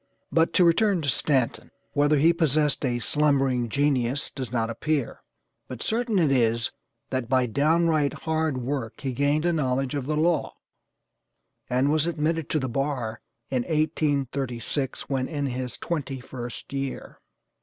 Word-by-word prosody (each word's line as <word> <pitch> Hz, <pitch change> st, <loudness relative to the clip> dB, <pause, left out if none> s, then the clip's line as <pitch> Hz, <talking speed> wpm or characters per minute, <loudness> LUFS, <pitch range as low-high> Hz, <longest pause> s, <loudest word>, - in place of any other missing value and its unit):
But 165 Hz, +2 st, +3 dB
to 180 Hz, -, +5 dB
return 180 Hz, +1 st, +3 dB
to 140 Hz, -, 0 dB
Stanton. 130 Hz, -3 st, 0 dB, 0.2 s
Whether 145 Hz, +1 st, +3 dB
he 160 Hz, +4 st, +5 dB
possessed 150 Hz, -3 st, +2 dB
a 125 Hz, -3 st, +1 dB
'slumbering 135 Hz, -2 st, +2 dB
genius' 140 Hz, 0 st, +1 dB
does 130 Hz, -5 st, -6 dB
not 115 Hz, -2 st, 0 dB
appear, 145 Hz, +3 st, -2 dB, 0.5 s
but 125 Hz, -3 st, -6 dB
certain 230 Hz, -1 st, 0 dB
it 160 Hz, -6 st, +3 dB
is 115 Hz, -3 st, +2 dB, 0.4 s
that 130 Hz, -3 st, -2 dB
by 130 Hz, -1 st, +3 dB
down 155 Hz, +8 st, +2 dB
right 155 Hz, -3 st, +2 dB
HARD 160 Hz, -3 st, -1 dB
WORK 125 Hz, -2 st, -4 dB
he 135 Hz, -2 st, -2 dB
gained 145 Hz, +5 st, +1 dB
a 175 Hz, -, +2 dB
knowledge 135 Hz, -3 st, 0 dB
of 140 Hz, -3 st, -3 dB
the 155 Hz, 0 st, 0 dB
law, 165 Hz, +1 st, +1 dB, 1.1 s
and 130 Hz, +3 st, +2 dB
was 155 Hz, +1 st, +2 dB
admitted 160 Hz, -1 st, -1 dB
to 155 Hz, -, +1 dB
the 130 Hz, -, -2 dB
bar 125 Hz, -3 st, -2 dB, 0.3 s
in 130 Hz, -2 st, +1 dB
1836, 140 Hz, -4 st, -1 dB
when 130 Hz, -2 st, -1 dB
in 145 Hz, -3 st, -2 dB
his 125 Hz, -1 st, -4 dB
twenty 140 Hz, -6 st, -3 dB
first 125 Hz, +1 st, -8 dB
year. 135 Hz, -1 st, -4 dB
140 Hz, 155 wpm, -26 LUFS, 125-155 Hz, 1.1 s, to